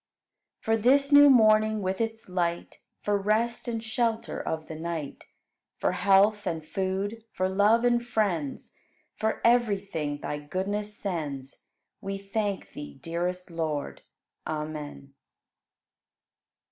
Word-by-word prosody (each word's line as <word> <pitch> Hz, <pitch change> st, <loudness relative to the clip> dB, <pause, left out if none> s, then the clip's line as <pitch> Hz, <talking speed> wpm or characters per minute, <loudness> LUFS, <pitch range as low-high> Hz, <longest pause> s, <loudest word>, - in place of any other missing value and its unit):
8. -, -, -26 dB
For 225 Hz, 0 st, +3 dB
this 275 Hz, +6 st, +3 dB
new 290 Hz, 0 st, +9 dB
morning 215 Hz, -3 st, +5 dB
with 190 Hz, +3 st, -1 dB
its 225 Hz, 0 st, -3 dB
light, 175 Hz, -2 st, -2 dB, 0.2 s
For 205 Hz, -1 st, +1 dB
rest 220 Hz, +5 st, 0 dB
and 230 Hz, -1 st, -3 dB
shelter 225 Hz, 0 st, -1 dB
of 160 Hz, -1 st, -3 dB
the -, -, -8 dB
night, 160 Hz, -2 st, -5 dB, 0.5 s
For -, -, +1 dB
health 200 Hz, +2 st, +3 dB
and 160 Hz, -3 st, -3 dB
food, 195 Hz, +6 st, -2 dB
for 185 Hz, -, 0 dB
love 205 Hz, +5 st, +3 dB
and 240 Hz, -1 st, +3 dB
friends. 195 Hz, -, -1 dB, 0.4 s
For 220 Hz, 0 st, -1 dB
everything 200 Hz, -11 st, +1 dB
Thy 150 Hz, -, -4 dB
goodness 205 Hz, +7 st, -3 dB
sends, 145 Hz, -8 st, -4 dB, 0.4 s
We 195 Hz, 0 st, -4 dB
thank 200 Hz, 0 st, -3 dB
Thee, 145 Hz, -1 st, -8 dB
dearest 175 Hz, +4 st, -3 dB
Lord. 155 Hz, -3 st, -3 dB, 0.5 s
Amen. 150 Hz, -2 st, -5 dB
195 Hz, 120 wpm, -27 LUFS, 165-220 Hz, 0.5 s, new